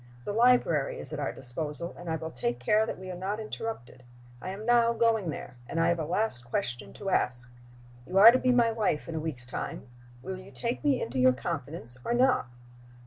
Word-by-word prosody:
The 205 - -2
library 230 - +3
is - - -4
at 150 - -3
our 140 - -1
disposal, 150 +6 -4
and 175 -1 -8
I 160 - 0
will 160 0 -5
take 120 -1 -2
care 210 - +2
that - - -4
we 185 0 -7
are - - -5
not 195 +4 -3
interrupted. 215 - -6 0.4
I 185 - -5
am 200 +3 -6
now 235 -1 +4
going 225 -5 +2
there, 125 -4 -7
and 165 - -2
I 165 +1 +3
have 170 -1 +1
a 160 - -2
last 175 - -1
question 120 0 -2
to 195 -2 -4
ask. 125 -4 0 0.6
You 185 - -1
are 215 +4 +11
to 255 - +2
be 255 - +2
my 240 -2 +4
wife 210 -9 -1
in 165 - -5
a 160 - -2
week's 150 -6 -2
time: 125 - -5 0.4
will 190 +3 -5
you 185 +1 -12
take 240 +4 -4
me 280 -4 +3
into 130 +3 -3
your 130 0 +6
confidence 125 0 -5
or 240 - 0
not?" 255 - +3
175 Hz, 220 wpm, -29 LUFS, 130-225 Hz, 0.6 s, are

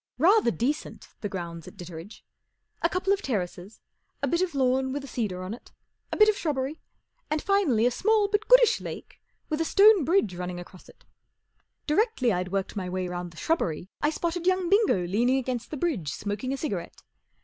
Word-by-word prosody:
Rather 370 - +5
decent, 260 +6 -3
the 205 - -3
grounds 170 -3 -6
at - - -12
Ditteredge. 175 +3 -10 0.6
A - - +2
couple 370 +1 +1
of 400 - -2
terraces, 195 - -4 0.4
a - - +2
bit 340 +1 +1
of 355 -5 -1
lawn 265 0 +2
with 285 +1 -4
a - - -8
cedar 205 -8 -3
on 185 +3 -5
it, 240 - -12 0.4
a - - -2
bit 425 - +7
of 430 - +4
shrubbery, 290 -3 -2 0.5
and 305 - 0
finally 310 - +2
a 245 - +3
small 435 - +2
but 415 +1 -1
goodish - - +6
lake - - -8 0.3
with 310 +1 -1
a - - +3
stone 405 +1 +6
bridge 315 - +2
running 180 0 -5
across 175 +1 -13
it. - - -20 0.8
Directly 305 - +2
I'd 180 0 -2
worked 195 -1 -2
my 185 -3 -3
way 185 0 -2
round 175 0 -5
the 165 - -17
shrubbery 185 - -1
I 295 - +3
spotted 340 +2 -2
young 370 -2 +2
Bingo 395 - +3
leaning 235 +8 +2
against 250 -2 -3
the 305 - -5
bridge 250 - -1
smoking 205 - -4
a 275 - -2
cigarette. 200 - -5
260 Hz, 195 wpm, -27 LUFS, -, 0.8 s, bit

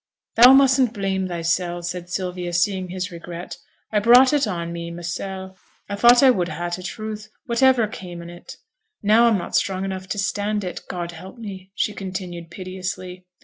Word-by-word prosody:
'Thou 245 +3 +9
mustn't 265 -3 +5
blame 190 -2 -1
thysel',' 175 0 -1
said 175 0 -5
Sylvia, 180 -1 -3
seeing 185 +1 0
his 185 +1 -4
regret. 170 +1 -8 0.3
'I 210 - +3
brought 245 +5 +6
it 285 -5 +2
on 170 -3 -3
me 170 0 -5
mysel'; 190 +3 -6 0.3
I 200 - -3
thought 240 +4 +6
I 265 - +8
would 180 -7 0
ha' 175 +2 -4
t' 180 - -3
truth, 215 +2 -6 0.2
whativer 245 0 +4
came 180 -4 -8
on 170 - -9
it, 175 - -11 0.5
and - - -6
now 230 +2 +6
I'm 225 -3 +3
not 175 - -5
strong 190 0 0
enough 190 -1 -5
to 205 - -4
stand 205 +1 -1
it, 180 - -5
God 175 -1 -4
help 185 +6 -11
me!' 195 -4 -9
she 210 - 0
continued, 180 -4 -6
piteously. 185 0 -6
190 Hz, 185 wpm, -22 LUFS, 175-215 Hz, 0.5 s, Thou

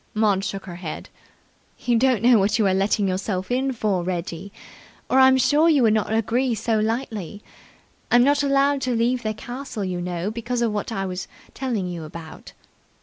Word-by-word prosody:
Maud 205 -3 +2
shook 195 -1 -4
her 175 -3 -8
head. 170 -4 -7 0.7
"You 240 - 0
don't 240 -2 +2
know 240 -2 +6
what 200 +4 +2
you 220 - +2
are 190 - +3
letting 195 +1 +1
yourself 185 +1 -2
in 265 +2 +1
for, 210 -6 -1
Reggie, 180 +1 -4 0.6
or 265 - +5
I'm 260 0 +6
sure 290 +6 +4
you 290 -5 +4
wouldn't 215 -1 +2
agree 230 +3 +1
so 220 +1 0
lightly. 215 -3 -3 0.7
I'm 240 0 +5
not 285 +2 +3
allowed 280 0 +2
to 255 -2 -1
leave 240 +2 +1
the 215 -2 -3
castle, 245 -2 -6
you 180 -1 -3
know, 180 +2 -3
because 235 +2 -2
of 230 - +1
what 210 +2 -3
I 195 -3 -2
was 185 0 -5 0.3
telling 240 -8 -2
you 175 -2 -5
about." 160 +1 -10
220 Hz, 185 wpm, -23 LUFS, 190-250 Hz, 0.7 s, know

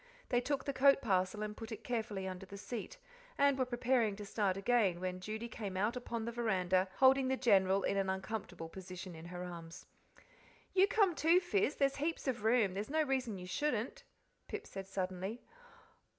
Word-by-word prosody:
They 245 -2 +3
took 275 +1 -1
the 280 - -1
coat 275 +1 +6
parcel 195 -2 0
and 210 0 -4
put 225 +1 -8
it 220 0 -6
carefully 215 -5 -2
under 185 +1 -6
the 200 - -9
seat, 240 - -6 0.4
and 280 -1 +4
were 260 -1 +1
preparing 240 -3 +1
to 205 0 -7
start 200 -2 0
again, 195 -4 +2
when 185 0 -3
Judy 215 +5 -4
came 205 -4 -5
out 210 +5 +1
upon 235 -2 -4
the 235 - -2
veranda, 190 -5 +1
holding 265 0 +5
the 265 0 +1
General 195 -5 +4
in 200 - +1
an 195 -1 +1
uncomfortable 190 -3 -4
position 185 +1 -8
in 160 0 -10
her 180 +1 -6
arms. 170 -1 -8 0.9
"You 385 +1 +5
come, 400 -3 +3
too, 330 +3 +4
Fizz, 370 -3 +1
there's 275 -1 +1
heaps 310 +1 -2
of 245 -5 -1
room 220 -4 +3
there's 205 +5 -4
no 310 +2 +2
reason 260 -7 -1
you 180 - -7
shouldn't," 270 - -2 0.4
Pip 425 - -5
said 195 -1 -7
suddenly. 190 +3 -3
220 Hz, 190 wpm, -35 LUFS, 190-260 Hz, 0.9 s, coat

